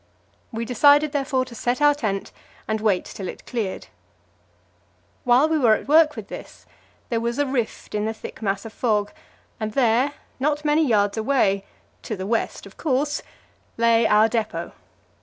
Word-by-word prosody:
We 230 0 -3
decided, 285 +5 +4
therefore, 270 -3 0
to 255 - -12
set 245 +3 -1
our 295 0 +5
tent 215 -9 -3 0.4
and 220 0 -1
wait 205 -4 +1
till 190 - -7
it - - -8
cleared. 220 -6 -3 1.4
While 250 +5 +5
we 315 -1 +1
were 230 -5 +5
at - - -7
work 305 0 +5
with - - -7
this, - - -10 0.4
there 230 - 0
was 235 +1 -2
a 290 - +2
rift 260 -4 -3
in 210 0 -1
the 220 - -1
thick - - -10
mass 200 -1 -1
of 225 - -8
fog, 210 -4 0 0.5
and 215 -1 -3
there, 250 +3 +2 0.3
not 295 +2 0
many 300 +2 +3
yards 205 -6 +2
away 215 -5 +1 0.4
to 215 - -4
the 185 - -4
west, 225 +2 -2
of - - -14
course 290 0 0 0.6
lay 230 0 +4
our 210 +1 +5
depot. 225 -2 -3
235 Hz, 170 wpm, -23 LUFS, 215-285 Hz, 1.4 s, our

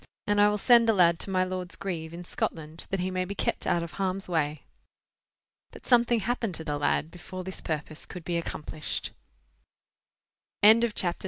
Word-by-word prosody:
And 205 0 +3
I 205 - +6
will 210 - 0
send 235 +1 +5
the - - +6
lad 170 -4 +4
to - - -3
my 185 -1 +2
lord's 185 -1 -3
grieve, 165 -4 -4
in 170 +1 -8
Scotland, 160 -2 -4
that 195 -2 -1
he 185 +1 -1
may 185 0 0
be 200 +2 -5
kept - - -2
out 170 - +2
of 170 - -7
harm's 195 0 -2
way." 155 -4 -1 1.1
But - - -14
something 240 -2 +4
happened 230 -3 -1
to 160 - -6
the 145 -2 -2
lad 150 +2 0
before 185 +1 -8
this 190 +1 -7
purpose 155 0 -4
could 180 - -8
be 175 - -2
accomplished. 155 -2 -4 1.5
CHAPTER 220 -2 +6
X. 170 - -5
185 Hz, 185 wpm, -28 LUFS, 165-205 Hz, 1.5 s, I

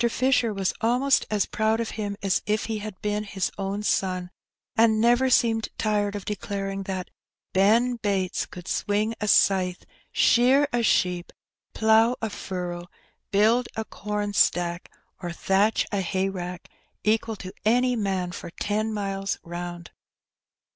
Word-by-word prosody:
Fisher 250 -1 +2
was 195 -2 -1
almost 250 +4 +2
as 210 -2 +1
^ - - -26
proud 220 +1 +1
of 230 - -2
him 205 -2 -4
as 195 -2 +1
if 210 +1 0
he 220 -2 -3
had 210 -2 -7
been 210 0 -1
his 195 -3 -2
own 195 +1 -2
son, 185 -3 0 0.4
and 220 -1 +4
never 240 +3 +4
seemed 225 -3 +2
tired 210 -2 0
of 200 - -6
declaring 195 -1 -3
that 190 -1 -5 0.2
" - - -62
Ben 230 +6 +3
Bates 195 -4 -1
could 180 -1 -11
swing 210 +2 0
a 210 - -1
scythe, 185 -3 +3 0.3
shear 260 +4 +4
a 240 - +2
sheep, 180 -5 +1 0.4
plough 220 +2 +4
a 220 -2 -3
furrow, 180 -3 -5 0.4
build 225 +5 +3
a 220 - -3
corn 210 -1 -4
stack, 175 -2 +1 0.3
or 175 -2 -4
thatch 195 +5 +2
a 200 -2 0
hayrick 185 -1 -3 0.4
equal 220 +1 +1
to 185 -2 -9
any 245 +3 +3
man 190 -5 -1
for 175 - -7
ten 215 +5 -2
miles 195 -2 -2
round.'' 175 0 -7
205 Hz, 150 wpm, -25 LUFS, 190-220 Hz, 0.4 s, and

